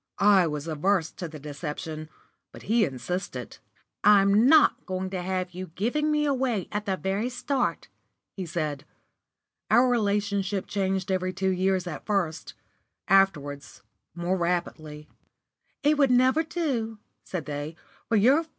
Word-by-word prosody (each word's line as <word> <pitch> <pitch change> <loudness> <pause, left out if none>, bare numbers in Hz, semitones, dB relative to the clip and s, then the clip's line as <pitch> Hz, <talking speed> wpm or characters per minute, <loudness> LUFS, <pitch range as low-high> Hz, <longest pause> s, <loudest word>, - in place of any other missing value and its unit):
I 200 -3 +5
was 150 0 -4
averse 165 +2 0
to 175 - -6
the 160 -1 -9
deception, 150 +1 -6 0.4
but - - -12
he 220 0 +3
insisted. 140 -1 -5 0.4
"I'm 205 +2 +6
not 310 +1 +5
going 185 0 -3
to 185 -2 -3
have 185 0 -2
you 185 +1 -6
giving 300 +10 0
me 300 0 +2
away 255 -8 0
at 210 0 -3
the 190 -1 0
very 195 +6 -1
start," 265 +2 -2 0.5
he 185 -3 -5
said. 155 -4 -3 0.9
Our 250 +2 +5
relationship 205 -4 0
changed 190 -1 -1
every 185 0 -1
two 190 +1 0
years 185 0 +1
at 165 -4 -7
first; 180 -6 -1 0.5
afterwards, 150 -8 +1 0.3
more 175 +2 -1
rapidly. 160 -4 -3
190 Hz, 115 wpm, -26 LUFS, 165-205 Hz, 0.9 s, I'm